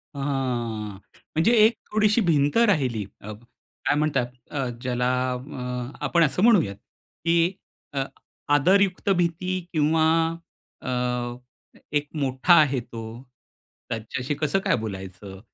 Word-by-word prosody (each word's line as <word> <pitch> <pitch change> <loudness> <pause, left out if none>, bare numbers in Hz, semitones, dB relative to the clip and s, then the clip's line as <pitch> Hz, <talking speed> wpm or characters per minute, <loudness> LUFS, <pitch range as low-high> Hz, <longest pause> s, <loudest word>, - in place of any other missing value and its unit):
ह, - - -6
हां. 120 -7 -2 0.4
म्हणजे 165 +9 +4
एक 225 - +4 0.2
थोडीशी 215 +1 +3
भिंत 145 0 +3
राहिली. 140 - +2 0.2
अ, 110 - -7 0.5
काय 145 - +3
म्हणतात? 150 -5 +1 0.2
अ, 135 -3 -1
ज्याला 125 0 0 0.2
अ, 125 -1 -5
आपण 170 -1 +3
असं 165 +6 +1
म्हणूयात, 190 - +4
की 170 - -1 0.4
अ, 135 -1 0 0.5
आदरयुक्त 190 +5 +3
भीती 180 +2 0
किंवा 155 +1 +3 0.8
अ, - - -5 1.1
एक 145 0 -3
मोठा 130 +6 +3
आहे 140 -3 +1
तो, 115 -1 -8 0.9
त्याच्याशी 120 +5 -3
कसं 155 +6 +1
काय - - +1
बोलायचं? 95 -2 -7
140 Hz, 115 wpm, -25 LUFS, 120-170 Hz, 1.1 s, म्हणजे